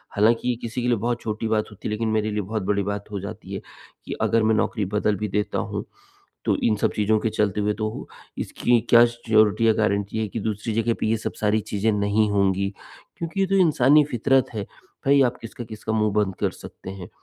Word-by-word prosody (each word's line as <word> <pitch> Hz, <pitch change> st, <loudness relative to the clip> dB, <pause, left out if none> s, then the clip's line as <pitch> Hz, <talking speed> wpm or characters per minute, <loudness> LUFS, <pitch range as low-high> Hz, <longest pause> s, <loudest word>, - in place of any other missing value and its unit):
हालाँकि 115 Hz, +4 st, +3 dB
ये 125 Hz, -, +1 dB
किसी 115 Hz, +1 st, -4 dB
के 125 Hz, -, -1 dB
लिए 120 Hz, -1 st, +2 dB
बहुत 120 Hz, +3 st, -2 dB
छोटी 110 Hz, +1 st, -3 dB
बात 110 Hz, -1 st, +1 dB
होती 105 Hz, -, -7 dB
है -, -, -3 dB
लेकिन 110 Hz, +1 st, -1 dB
मेरे 110 Hz, 0 st, 0 dB
लिए 105 Hz, -, -1 dB
बहुत 105 Hz, +1 st, -3 dB
बड़ी 100 Hz, +1 st, 0 dB
बात 100 Hz, +1 st, -3 dB
हो 100 Hz, -, -3 dB
जाती 100 Hz, 0 st, -8 dB
है। 95 Hz, -, -4 dB, 0.4 s
कि -, -, -4 dB
अगर 115 Hz, -1 st, +2 dB
मैं 110 Hz, 0 st, +3 dB
नौकरी 105 Hz, -1 st, 0 dB
बदल 105 Hz, +2 st, 0 dB
भी 105 Hz, -, -2 dB
देता 105 Hz, +2 st, -1 dB
हूँ -, -, -3 dB, 0.6 s
तो -, -, +2 dB
इन 110 Hz, -, +3 dB
सब -, -, 0 dB
चीज़ों 110 Hz, +1 st, +2 dB
के 115 Hz, -, 0 dB
चलते 105 Hz, -1 st, 0 dB
हुए 105 Hz, 0 st, +1 dB
तो 110 Hz, 0 st, -2 dB
हूँ, -, -, -8 dB, 0.3 s
इसकी 120 Hz, -1 st, +1 dB
क्या 120 Hz, 0 st, +8 dB
सिऑरिटी 115 Hz, -2 st, +2 dB
या -, -, +6 dB
गारंटी 100 Hz, -1 st, 0 dB
है 110 Hz, -1 st, -1 dB
कि 115 Hz, -, -4 dB
दूसरी 110 Hz, +2 st, -3 dB
जगह 115 Hz, +1 st, +1 dB
पे -, -, 0 dB
ये 115 Hz, -, +2 dB
सब 110 Hz, -, -4 dB
सारी 110 Hz, 0 st, +2 dB
चीज़ें 105 Hz, +1 st, -1 dB
नहीं 105 Hz, +1 st, +2 dB
होंगी। 100 Hz, -1 st, +2 dB, 0.5 s
क्योंकि 170 Hz, +3 st, -4 dB
ये 195 Hz, -, +3 dB
तो 195 Hz, -, 0 dB
इंसानी 150 Hz, -4 st, +5 dB
फितरत 130 Hz, +3 st, +2 dB
है। 105 Hz, -1 st, -3 dB, 0.4 s
भई 140 Hz, 0 st, +5 dB
आप 125 Hz, -1 st, +1 dB
किसका-किसका 110 Hz, -1 st, -6 dB
मुँह 110 Hz, -1 st, +1 dB
बंद 105 Hz, -3 st, +1 dB
कर -, -, +1 dB
सकते 95 Hz, -, -10 dB
हैं। 95 Hz, -2 st, -8 dB
110 Hz, 230 wpm, -24 LUFS, 105-115 Hz, 0.6 s, क्या